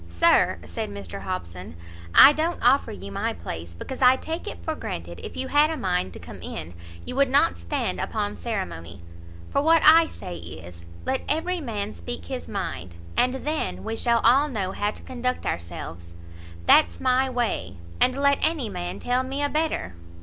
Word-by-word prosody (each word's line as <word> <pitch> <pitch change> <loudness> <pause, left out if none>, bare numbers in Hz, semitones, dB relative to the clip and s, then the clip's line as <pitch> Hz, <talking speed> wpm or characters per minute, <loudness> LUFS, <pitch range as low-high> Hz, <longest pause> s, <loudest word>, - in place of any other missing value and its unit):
"Sir," 85 -1 +4
said 85 +5 -4
Mr 100 -2 -7
Hobson, 90 -2 -6 0.4
"I 290 - +10
don't 325 +3 -1
offer 260 +4 +4
you 100 +2 -8
my - - -1
place, 85 -1 -7
because 265 - -7
I 255 0 +7
take 320 +5 -5
it - - -5
for - - -1
granted 85 +1 -6
if - - -7
you 265 0 -3
had 295 +2 +5
a 320 - -3
mind 180 - -1
to - - -9
come - - -10
in, 80 +2 -6 0.3
you - - -5
would 275 -1 +3
not 255 - +4
stand 85 0 -3
upon 105 0 -2
ceremony; 85 -1 -5 0.5
for 280 - +2
what 325 +2 +4
I 325 +1 +8
say 90 - -8
is, 85 +1 -10 0.2
let 265 - 0
every 345 +4 0
man 215 -7 -4
speak 85 -1 -7
his - - -5
mind, 85 +1 -4 0.2
and 250 +1 +2
then 310 +1 -2
we 220 +1 -3
shall 235 0 +2
all 265 +6 +5
know 200 -7 -2
how 205 +1 -1
to - - -8
conduct 250 0 -3
ourselves. 85 0 -5 0.5
That's 85 0 +5
my 255 +1 +2
way, 230 - -2 0.2
and 255 - +4
let 280 0 +3
any 310 -8 +1
man 90 - -5
tell 245 - 0
me 270 +2 -3
a 285 - +1
better!" 305 - -1
205 Hz, 185 wpm, -25 LUFS, -, 0.5 s, I